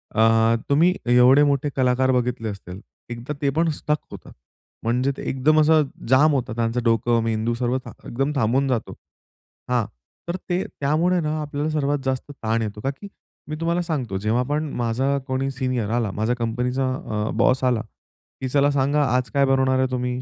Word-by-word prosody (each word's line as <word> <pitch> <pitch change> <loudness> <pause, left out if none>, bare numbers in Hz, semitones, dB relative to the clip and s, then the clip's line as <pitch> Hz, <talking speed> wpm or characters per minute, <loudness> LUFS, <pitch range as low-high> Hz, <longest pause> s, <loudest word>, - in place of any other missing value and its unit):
अ, 115 +1 +4
तुम्ही 165 +6 +4 0.2
एवढे 125 +4 +6
मोठे 145 0 +1
कलाकार 130 0 +2
बघितले 125 -3 -1
असतील. 95 -1 -8 0.3
एकदा 120 +5 -5
ते 140 - +2
पण 165 0 +3
स्टक 150 +1 0 0.2
होतात. - - -11 0.5
म्हणजे 125 +4 +1
ते - - -7
एकदम 155 +4 +3
असं 155 0 +5 0.3
जाम 145 +4 +5
होता 125 -4 -1
त्यांचं 115 +1 -1
डोकं, 115 0 +2
मेंदू 115 +1 -1
थाम 125 +1 +1 0.3
एकदम 135 +5 -1
थांबून 130 +3 +2
जातो. 125 -4 -2 0.8
हां. 120 -4 +1 0.4
तर 170 - -2
ते 180 +2 +1
त्यामुळे 160 +6 0
ना 155 0 -2
आपल्याला 145 +1 -3
सर्वात 145 -2 0
जास्त 130 +2 -2
ताण 115 -4 -2
येतो. 105 -1 -4
का 135 - -1
की 200 - -7 0.4
मी 155 - -3
तुम्हाला 170 +1 +1
सांगतो, 135 - -3
जेव्हा 110 +5 0
पण 150 +1 -1
माझा 130 +5 0
कोणी 130 +1 -1
सीनियर 130 -4 -2
आला, 115 -4 0
माझ्या 110 +4 -1
कंपनीचा 125 +3 -1
अ, 105 -3 -3
बॉस 130 +1 +3
आला, 125 -4 +2 0.6
की 130 - -2
चला 145 +1 +3
सांगा 140 +2 +2
आज 125 0 0
काय 140 -1 +3
बनवणार 130 -1 +2
आहे 130 - +2
तुम्ही? 125 0 -2
130 Hz, 175 wpm, -23 LUFS, 115-145 Hz, 0.8 s, एवढे